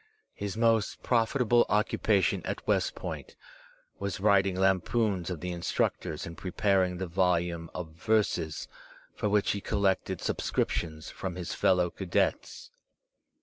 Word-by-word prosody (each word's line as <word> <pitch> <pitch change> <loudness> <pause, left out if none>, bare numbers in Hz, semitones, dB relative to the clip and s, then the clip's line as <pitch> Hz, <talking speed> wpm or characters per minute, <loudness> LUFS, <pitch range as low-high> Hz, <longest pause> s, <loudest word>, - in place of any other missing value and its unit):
His 100 +1 -5
most 115 -3 +2
profitable 120 0 +3
occupation 105 -2 +2
at - - -4
West - - +1
Foint - - -6 0.6
was 100 -1 -3
writing 100 -2 +3
lampoons 95 0 +1
of 90 -4 -5
the 90 0 -3
instructors 85 -1 -1
and 85 - -7
preparing 95 0 +1
the 95 - -3
volume 85 -2 0
of 90 -3 -5
verses 85 -2 0 0.5
for 105 - -1
which 105 0 +2
he 100 - -3
collected 100 -2 0
subscriptions 80 -1 -2
from 95 -2 -5
his 90 -2 -4
fellow 90 -2 +2
cadets. 95 -3 -1
95 Hz, 125 wpm, -29 LUFS, 90-105 Hz, 0.6 s, profitable